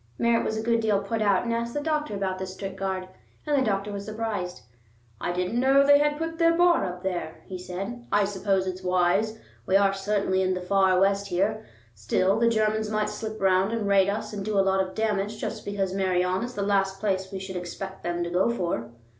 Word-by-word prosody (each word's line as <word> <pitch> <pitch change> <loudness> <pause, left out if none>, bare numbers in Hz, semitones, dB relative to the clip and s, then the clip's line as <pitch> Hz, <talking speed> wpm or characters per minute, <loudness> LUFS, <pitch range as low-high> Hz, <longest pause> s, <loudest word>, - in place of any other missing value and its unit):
Merritt 235 0 +2
was 220 - -2
a 220 - -3
good 230 0 +2
deal 215 -3 +2
put 215 +3 -3
out, 200 -3 +3
and 235 -1 -1
asked 235 0 -2
the - - +1
doctor 300 -6 -1
about 190 -1 -2
this 190 0 -5
strict 195 0 -6
guard. 190 -1 -3 0.4
And 300 -1 +1
the 270 - +3
doctor 200 -2 -1
was 200 0 -5
surprised. 215 - -4 0.6
"I - - -2
didn't 180 +6 -1
know 270 +2 +5
they 285 0 +7
had 295 0 +1
put 325 +1 -4
their 335 0 +4
bar 350 -1 +4
up 180 0 -6
there," 175 -4 -3
he 185 -1 -7
said. 195 +7 -6
"I 205 - +4
suppose 195 -1 0
it's 185 0 -4
wise. 185 +4 +1 0.3
We 190 - +2
are 195 -1 +3
certainly 195 -1 0
in 185 0 +1
the - - -3
far 190 0 +3
West 200 +1 +2
here; 205 +4 -1 0.3
still, 185 - +1
the 230 0 +4
Germans 215 -1 +1
might 215 0 0
slip 220 -1 -6
round 190 +2 +2
and 220 -3 -1
raid 195 -1 +4
us 215 +1 -3
and 200 -1 -4
do 210 0 -1
a 195 - +4
lot 190 0 +3
of 185 0 -4
damage 210 -1 -1
just 215 -1 -5
because 195 -2 -2
Meirion 185 -1 +1
is 245 +1 -5
the 200 - -1
last 195 -1 +1
place 190 -2 -1
we 195 - -4
should 190 0 -7
expect 190 +2 -6
them 175 0 -2
to 170 - -4
go 180 +5 +2
for." 170 - -2
200 Hz, 230 wpm, -26 LUFS, 185-220 Hz, 0.6 s, they